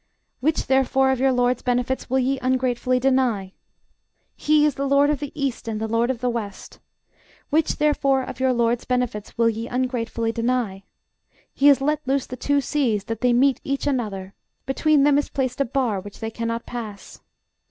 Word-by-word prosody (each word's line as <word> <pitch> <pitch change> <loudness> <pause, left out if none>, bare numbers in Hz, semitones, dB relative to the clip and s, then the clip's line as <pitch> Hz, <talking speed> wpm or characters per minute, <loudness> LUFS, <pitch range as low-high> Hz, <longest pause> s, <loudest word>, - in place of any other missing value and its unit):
Which, 305 +5 0
therefore, 265 0 +3
of 265 - -1
your 265 +1 +3
LORD'S 245 -1 +1
benefits 250 +1 -1
will 260 - +1
ye 265 +1 +1
ungratefully 255 -1 +1
deny? 250 -7 +1 0.8
He 300 0 +3
is 300 - +2
the 275 +2 -2
LORD 280 +1 +4
of 295 - -1
the 290 -1 -5
east, 270 -4 -2
and 220 -1 -3
the 220 - -2
LORD 230 +2 +1
of 250 -3 -2
the 250 - +1
west. 210 -4 -6 0.7
Which, 310 +1 +2
therefore, 275 -3 +2
of - - -8
your 260 0 +2
LORD'S 235 -1 +1
benefits 250 -4 -2
will 230 0 +3
ye 225 +1 -2
ungratefully 240 -2 -2
deny? 230 -4 -1 0.7
He 280 - +3
hath 280 -2 +6
let 300 +2 +1
loose 270 0 +1
the 255 - -7
two 285 +3 +1
seas, 245 -7 0
that 225 0 -5
they 250 - +3
meet 260 +2 +3
each 275 +1 -2
another: 210 -9 -2 0.3
between 290 +2 +2
them 290 0 +4
is 290 - -3
placed 260 -1 -2
a - - +3
bar 235 -5 -1
which 205 +1 -11
they 225 -1 -4
cannot 230 0 -3
pass. 215 -5 -8
255 Hz, 185 wpm, -23 LUFS, 230-275 Hz, 0.8 s, hath